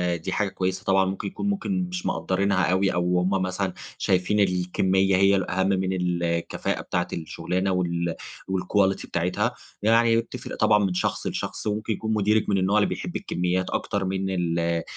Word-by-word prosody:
دي 85 - -5
حاجة 105 -2 0
كويّسة 95 0 -2
طبعًا 95 0 +3
ممكن 95 +2 -3
يكون 205 - -3
ممكن 195 -2 -1
مش 180 0 -5
مقدّرينها 95 0 +1
أوي 95 +1 +2
أو 90 0 +1
هُم 90 +1 +1
مثلًا 95 0 -1 0.2
شايفين 95 +3 +1
الكميّة 95 0 +2
هي 100 +1 +5
الأهم 95 0 0
من 95 -1 +1
الكفاءة 85 -1 -1
بتاعة 90 0 -1
الشغلانة، 90 +4 -2
وال 85 -2 -1 0.4
والquality 95 +1 +1
بتاعتها 85 +2 -1 0.3
يعني 115 +1 +4
وبتفرق 115 - -4
طبعًا 105 - +4
من 95 - -1
شخص 90 - -1
لشخص، - - -4
وممكن 105 +1 -1
يكون 110 +2 -2
مديرِك 105 +1 +2
من 100 - +2
النوع 95 +3 +2
اللي 105 - +3
بيحب - - -5
الكميّات 90 +1 -1
أكتر 100 -2 -1
من 95 0 -1
ال 85 -2 0
آآ، 85 0 0
95 Hz, 170 wpm, -25 LUFS, 90-100 Hz, 0.4 s, هي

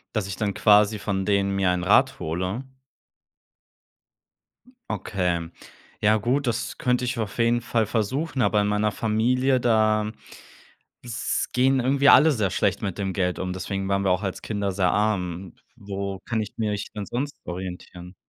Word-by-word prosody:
Dass 100 -3 -1
ich 95 - -4
dann 105 -2 -1
quasi 105 0 +4
von 95 -2 -2
denen 100 -1 +1
mir 95 -2 +2
einen 90 -1 -1
Rat - - +4
hole? 90 +10 -3 2.2
Okay. 90 -5 -2 0.5
Ja 110 +1 +4
gut, 125 +5 0
das 120 +1 -2
könnte 125 0 0
ich 120 -1 -2
auf 105 0 -4
jeden 120 +1 +2
Fall 115 -1 0
versuchen, 130 +7 -1
aber 105 -3 +3
in 105 - 0
meiner 105 0 +1
Familie, 125 +5 +1
da 110 -2 +2 0.9
s 120 -1 -2
gehen 130 +1 +3
irgendwie 140 +3 +3
alle 155 +4 +7
sehr 105 -8 0
schlecht 100 -1 0
mit 100 -3 -3
dem 95 -2 -2
Geld 90 -2 -1
um, 90 0 -3
deswegen 95 +1 -4
waren 100 0 +1
wir 95 - +2
auch 95 +3 0
als 95 - -4
Kinder 100 -2 -2
sehr 90 -1 +1
arm. 95 -4 -1 0.2
W 100 - -18
wo 100 -1 -4
kann 110 -2 -1
ich 105 - -6
mich 105 -2 -2
denn 105 -1 -5
sonst 140 +7 -4
orientieren? 90 0 -7
105 Hz, 165 wpm, -24 LUFS, 95-120 Hz, 2.2 s, alle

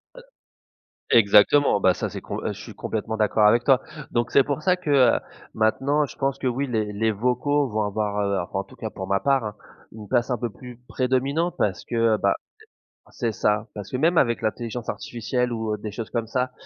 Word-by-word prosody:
Heu - - -11 1.0
exactement, 105 +4 +5
bah 95 -2 +4
ça - - -3
c'est - - -7
comp - - -5
heu, - - -2
je - - -11
suis - - -10
complètement 110 0 -3
d'accord 105 0 +3
avec 115 +3 +4
toi. 135 -2 +4 0.3
Donc 120 -1 0
c'est 140 - +5
pour 145 +2 -3
ça 180 -1 +3
que 180 -4 -6
heu, 130 -4 +5 0.4
maintenant 135 +7 +2
je 130 - -11
pense 135 0 -1
que - - -5
oui 130 +3 -1
les, 110 -4 -2
les 110 +2 +1
vocaux 125 +6 +1
vont 110 -1 -1
avoir 105 0 -2
heu- 100 -1 0
en 95 - -1
tout - - -17
cas 110 - -5
pour 95 -1 -6
ma 100 0 +1
part 135 0 +2
hein- 105 -1 -5 0.4
une 105 -1 -10
place 120 +1 +1
un 125 - 0
peu 120 +1 -3
plus 125 +3 -12
prédominante 135 +7 0
parce 95 - -1
que - - -5
heu, 115 -1 +3
bah, - - +2 0.8
heu - - -21
c'est 115 - -2
ça, 105 0 0
parce 105 -2 -8
que 130 - -1
même 165 +5 +2
avec 120 -3 +1
l'intelligence 115 +2 -3
artificielle 125 +2 -2
ou 110 -2 -2
heu, - - -2
des 105 0 -6
choses 110 +2 -6
comme 115 -2 -2
ça, 125 +3 -1
115 Hz, 225 wpm, -24 LUFS, 105-130 Hz, 1.0 s, exactement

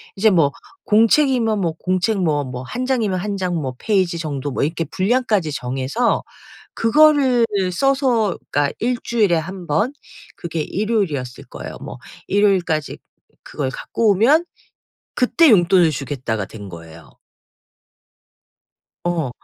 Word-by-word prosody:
이제 220 +3 +4
뭐 165 -8 +3 0.3
공책이면 230 0 +3
뭐 170 -3 0
공책 185 +3 0
뭐 150 -4 +1
뭐 125 -2 -6
1 245 - -4
장이면 225 -8 0
1 205 +2 -3
장 180 -2 -2
뭐 135 -6 -3
페이지 185 -6 0
정도 145 -3 -4
뭐 - - -2
이렇게 165 +3 -1
분량까지 200 - 0
정해서 135 - -1 0.5
그거를 265 -1 +4 0.3
써서 255 -3 +1
그러니까 145 -1 +1
1 245 +2 0
주일에 215 -6 +1
1 180 +3 -6
번 210 - 0 0.4
그게 165 -2 -4
일요일이었을 185 - -2
거예요. - - -9
뭐 - - -8 0.3
"일요일까지 185 -7 +1 0.4
그걸 135 -3 -4
갖고 220 +9 0
오면 265 - +4 0.7
그때 305 +6 +4
용돈을 175 -4 +5
주겠다."가 130 -7 -3
된 100 -1 -10
거예요. 85 -3 -12 2.0
어. 170 -6 -1
185 Hz, 255 characters per minute, -20 LUFS, 145-230 Hz, 2.0 s, 용돈을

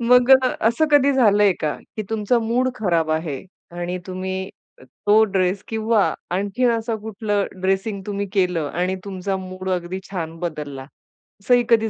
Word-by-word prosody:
मग 250 +2 +5
अ, 260 -1 +6
असं 315 +7 +2
कधी 280 -1 +5
झालंय 210 -6 +4
का, 150 -1 -1 0.2
की 215 - -2
तुमचा 220 +2 +1
मूड 235 +3 +1
खराब 170 -8 0
आहे 155 -3 -2 0.4
आणि 175 +1 -3
तुम्ही 190 +1 -4 0.6
तो 215 +2 +7
ड्रेस 190 -1 0
किंवा 220 -2 +1 0.2
आणखीन 205 +7 +1
असं 230 0 -1
कुठलं 210 -1 -1 0.2
ड्रेसिंग 195 +2 0
तुम्ही 200 0 -2
केलं 180 -6 +1
आणि 180 +2 0
तुमचा 195 0 -3
मूड 185 0 -6
अगदी 180 0 -2
छान 165 -4 -5
बदलला, 150 -5 -5 0.6
असंही 245 +4 +4
कधी 225 -1 +4
200 Hz, 150 wpm, -22 LUFS, 180-225 Hz, 0.6 s, तो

